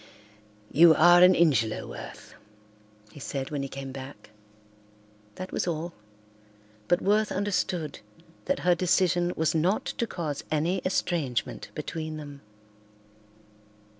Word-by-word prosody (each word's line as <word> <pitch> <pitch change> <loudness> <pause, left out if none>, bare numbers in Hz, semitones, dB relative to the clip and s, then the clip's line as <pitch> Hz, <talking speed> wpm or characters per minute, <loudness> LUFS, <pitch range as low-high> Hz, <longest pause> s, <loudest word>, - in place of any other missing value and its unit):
"You 165 0 +7
are 175 +2 +7
an 180 0 +7
Ingelow, 135 -10 +2
Worth," - - -10 0.8
he 145 - -12
said 135 0 -4
when 145 -2 -2
he 135 - -4
came 135 0 -7
back. 135 -4 -10 1.0
That 185 - -7
was - - -2
all, 170 +1 -3 0.9
but 175 - +2
Worth 210 +2 +2
understood 190 -4 -2 0.5
that 280 - -1
her 180 0 +4
decision 175 0 +2
was 160 0 +1
not 175 +6 +1
to 235 - -2
cause 155 -8 -4
any 165 +5 0
estrangement 150 - -2
between 155 +1 -5
them. 145 -2 -9
165 Hz, 120 wpm, -27 LUFS, 145-180 Hz, 1.0 s, You